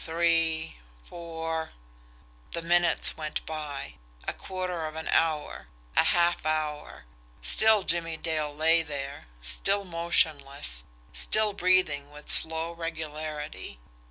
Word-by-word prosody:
Three. 165 - 0 0.3
Four." 165 -1 -5 0.8
The 170 - -3
minutes 175 +1 +3
went 155 -1 -4
by 150 -3 -6 0.3
a - - -1
quarter 180 -3 -4
of 155 - -9
an 160 - -6
hour 155 - 0 0.3
a - - +5
half 175 0 +2
hour. 150 - -3 0.4
Still 220 - +4
Jimmie 165 -2 0
Dale 155 -2 -2
lay 160 +3 +3
there 140 - -6 0.2
still 195 - 0
motionless 145 - +1 0.3
still 210 - +3
breathing 180 -7 +2
with 150 0 -4
slow 160 +1 +6
regularity. 155 - -6
160 Hz, 110 wpm, -27 LUFS, 150-170 Hz, 0.8 s, slow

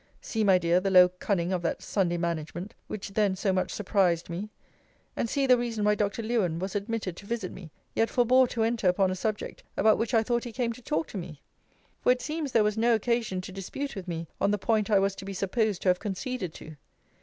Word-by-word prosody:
See, 220 -1 -2
my 195 -3 +6
dear, 170 0 +3
the 195 +1 -1
low 180 -1 +7
cunning 180 0 -1
of 180 - 0
that 170 - -2
Sunday 175 -4 0
management, 170 +2 -3
which 210 -1 -5
then 200 -1 +1
so 190 0 0
much 185 - 0
surprised 185 -5 +1
me! 190 +5 -4 0.7
And 230 - -1
see 275 +2 +1
the 250 -2 +5
reason 230 -3 -2
why 210 - +5
Dr. 210 +2 -1
Lewen 215 -8 0
was 190 +2 -4
admitted 205 -3 -3
to 200 - -11
visit 225 -5 -3
me, 180 -4 -10 0.2
yet 225 - +2
forbore 255 +1 +4
to 225 - -1
enter 225 -3 +1
upon 185 +1 +2
a - - -2
subject 210 +3 -3 0.2
about 215 +1 +4
which 230 +1 0
I 225 - +4
thought 240 +1 0
he 240 - -6
came 235 0 -1
to 250 - -13
talk 300 +5 -1
to 200 - -5
me! 165 -5 -9 0.6
For - - +4
it 250 0 +1
seems 305 -2 -3
there 225 -3 +4
was 210 +1 0
no 235 +1 +4
occasion 225 -4 0
to 185 - -8
dispute 195 +9 -5
with 190 -2 -7
me 165 -1 -4
on - - +3
the 210 - +2
point 215 0 +1
I 205 - +5
was 195 0 +2
to 195 - -7
be 195 0 -5
supposed 200 +1 0
to 185 - +3
have 180 0 +3
conceded 205 - -3
to. 155 -1 -10
205 Hz, 235 wpm, -28 LUFS, 185-230 Hz, 0.7 s, low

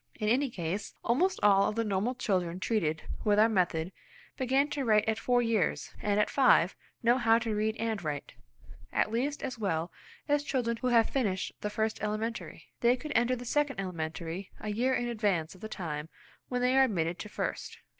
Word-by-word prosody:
In 215 -1 0
any 265 +4 +2
case, 190 0 -4
almost 360 +11 +2
all 200 -1 +5
of 210 - -5
the 230 - +1
normal 210 +4 0
children 185 -7 -1
treated 165 -7 0 0.2
with 205 -1 +3
our 215 +1 +6
method 180 -5 0 0.4
begin 265 +2 +2
to 280 - -1
write 215 -3 +3
at 220 0 +1
four 245 -1 +2
years, 225 -6 0
and 205 0 +1
at 210 - +3
five 250 -9 +4 0.3
know 240 +2 +4
how 225 -1 +5
to 225 -1 -2
read 215 +1 0
and 225 -4 -2
write, 145 -2 -4 0.6
at - - +1
least 275 +6 -1
as 245 -3 -4
well 170 -5 -1 0.4
as 290 0 +2
children 240 -5 -1
who 255 - -2
have 235 -2 +4
finished 200 -9 0
the 210 - -2
first 220 +1 -2
elementary. 215 +2 -4
They 240 +2 +4
could 300 +4 -7
enter 240 +2 +3
the 245 0 -8
second 290 -1 0
elementary 170 0 -4
a 215 - -5
year 245 +5 +1
in 240 - -1
advance 205 -9 0
of 185 - -17
the 220 - -6
time 160 -6 -5 0.4
when 250 -1 -1
they 250 +1 +3
are 265 - +7
admitted 175 -7 -1
to 210 - -6
first. - - -4
220 Hz, 195 wpm, -30 LUFS, 190-245 Hz, 0.6 s, are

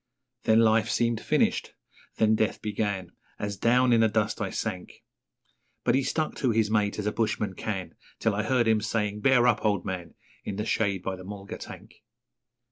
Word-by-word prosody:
Then 110 +1 +5
life 110 0 +3
seemed 115 -2 +1
finished - - 0 0.4
then 110 0 +3
death 110 0 0
began 100 -4 -2 0.3
As 100 -1 -3
down 125 +4 +3
in 115 - +4
the 110 - +5
dust 105 0 -1
I 100 - -1
sank, 95 -4 -5 0.8
But - - +2
he 135 - +3
stuck 155 +3 -1
to 130 - +1
his 110 -2 +1
mate 105 -2 +1
as 105 - -3
a 105 - +1
bushman 105 -3 -1
can, 95 -1 -4 0.2
Till 110 - +1
I 100 - 0
heard 120 +1 +1
him 110 -1 +3
saying, 105 -2 -1
'Bear 130 -1 +4
up, 120 -3 +3
old 100 -4 +1
man!' 90 -3 -5 0.3
In 100 - -4
the 105 +2 -3
shade 100 -4 0
by 95 - -2
the 90 - -10
mulga 100 +1 -8
tank. - - -11
110 Hz, 190 wpm, -27 LUFS, 100-115 Hz, 0.8 s, Then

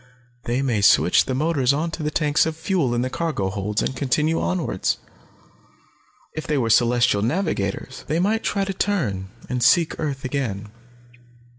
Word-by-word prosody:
They 125 +3 0
may 120 -6 0
switch 95 -2 +5
the 130 - -2
motors 140 -3 +1
onto 160 +3 -2
the 150 - 0
tanks 150 0 +2
of 160 -1 -4
fuel 160 -7 0
in 120 - 0
the 130 - -2
cargo 155 - -2
holds, 105 +1 -2
and 130 - -2
continue 150 +5 0
onwards. 175 - -1 1.4
If 155 - -5
they 150 - 0
were 115 -4 +1
celestial 120 -2 +3
navigators, 130 - -2
they 155 - 0
might 215 +5 +1
try 200 -1 0
to 195 - -3
turn, 115 - -1 0.2
and 125 -1 -2
seek 165 +7 +3
earth 140 -4 -3
again. 110 -7 -3
135 Hz, 160 wpm, -22 LUFS, 115-160 Hz, 1.4 s, switch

